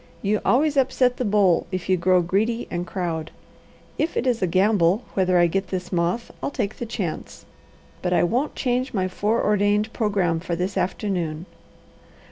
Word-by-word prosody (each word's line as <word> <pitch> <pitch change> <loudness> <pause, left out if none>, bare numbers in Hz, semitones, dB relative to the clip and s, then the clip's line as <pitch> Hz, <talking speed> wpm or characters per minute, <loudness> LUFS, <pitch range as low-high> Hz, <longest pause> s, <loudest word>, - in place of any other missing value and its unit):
You 210 +1 +1
always 290 +3 +2
upset 255 -1 +2
the - - -1
bowl 200 -4 +3
if 185 -1 -4
you 190 - +3
grow 180 0 +3
greedy 220 +7 0
and 175 +1 -3
crowd. 170 -4 -3 0.7
If 320 - -1
it - - 0
is 245 -4 +1
a 185 - +2
gamble 190 +2 +3
whether 185 -2 +2
I 175 - +5
get 190 +3 -1
this 180 -1 -4
moth, 175 +6 -1
I'll - - -1
take 210 -7 -3
the 240 - -5
chance; 195 -8 -5 0.6
but 180 - -1
I 180 - +3
won't 245 - 0
change 255 -1 -1
my 185 -1 +1
foreordained 210 +1 +1
programme 195 -7 0
for 170 0 -3
this 185 +3 -2
afternoon. 175 -5 -2
195 Hz, 170 wpm, -23 LUFS, 180-225 Hz, 0.7 s, I